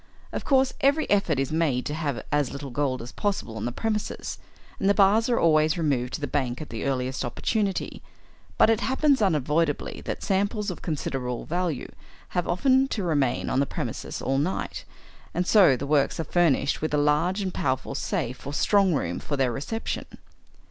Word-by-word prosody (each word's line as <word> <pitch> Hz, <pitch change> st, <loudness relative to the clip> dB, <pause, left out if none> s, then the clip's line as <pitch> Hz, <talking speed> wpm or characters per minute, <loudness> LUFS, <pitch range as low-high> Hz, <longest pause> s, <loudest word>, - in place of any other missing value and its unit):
Of -, -, -4 dB
course 265 Hz, -2 st, +3 dB
every 285 Hz, +3 st, +3 dB
effort 195 Hz, -7 st, +2 dB
is 135 Hz, +1 st, -1 dB
made 155 Hz, -6 st, +1 dB
to 150 Hz, -, -3 dB
have 150 Hz, -5 st, -2 dB
as 145 Hz, -3 st, +2 dB
little 140 Hz, -1 st, -6 dB
gold 130 Hz, -2 st, -1 dB
as 120 Hz, -, -8 dB
possible 195 Hz, -, -2 dB
on 110 Hz, 0 st, -4 dB
the 120 Hz, -, -1 dB
premises, 215 Hz, -, -3 dB, 0.4 s
and 195 Hz, -, +2 dB
the 200 Hz, -, +4 dB
bars 210 Hz, +4 st, +4 dB
are 240 Hz, -, +2 dB
always 155 Hz, 0 st, +3 dB
removed 135 Hz, -6 st, 0 dB
to -, -, -7 dB
the -, -, 0 dB
bank 130 Hz, -3 st, -1 dB
at 155 Hz, -, -8 dB
the 115 Hz, +2 st, -4 dB
earliest 130 Hz, -1 st, -1 dB
opportunity; 195 Hz, -, -2 dB, 0.6 s
but -, -, +6 dB
it 225 Hz, -, +2 dB
happens 265 Hz, 0 st, +2 dB
unavoidably 150 Hz, -4 st, 0 dB
that -, -, -4 dB
samples 200 Hz, +1 st, 0 dB
of 180 Hz, -, -8 dB
considerable 130 Hz, -6 st, -3 dB
value 175 Hz, -5 st, -2 dB, 0.4 s
have 175 Hz, -1 st, -1 dB
often 260 Hz, +8 st, +3 dB
to 215 Hz, -7 st, -3 dB
remain 145 Hz, -7 st, +1 dB
on 130 Hz, -, +1 dB
the 140 Hz, -, +2 dB
premises -, -, -5 dB
all 135 Hz, +1 st, +1 dB
night, 170 Hz, +7 st, -2 dB, 0.5 s
and 180 Hz, -, +1 dB
so 185 Hz, -, +6 dB
the 140 Hz, -, -4 dB
works 145 Hz, +1 st, +1 dB
are -, -, 0 dB
furnished 155 Hz, -4 st, +2 dB
with 155 Hz, -1 st, 0 dB
a -, -, +2 dB
large 150 Hz, +6 st, +2 dB
and 190 Hz, -2 st, -3 dB
powerful 130 Hz, +1 st, -1 dB
safe 130 Hz, -2 st, -3 dB
or 145 Hz, -, -4 dB
strong 195 Hz, -2 st, +3 dB
room 85 Hz, -10 st, -2 dB
for 145 Hz, -, -3 dB
their 130 Hz, -2 st, +2 dB
reception. 185 Hz, -, -4 dB
155 Hz, 190 wpm, -26 LUFS, 135-195 Hz, 0.6 s, but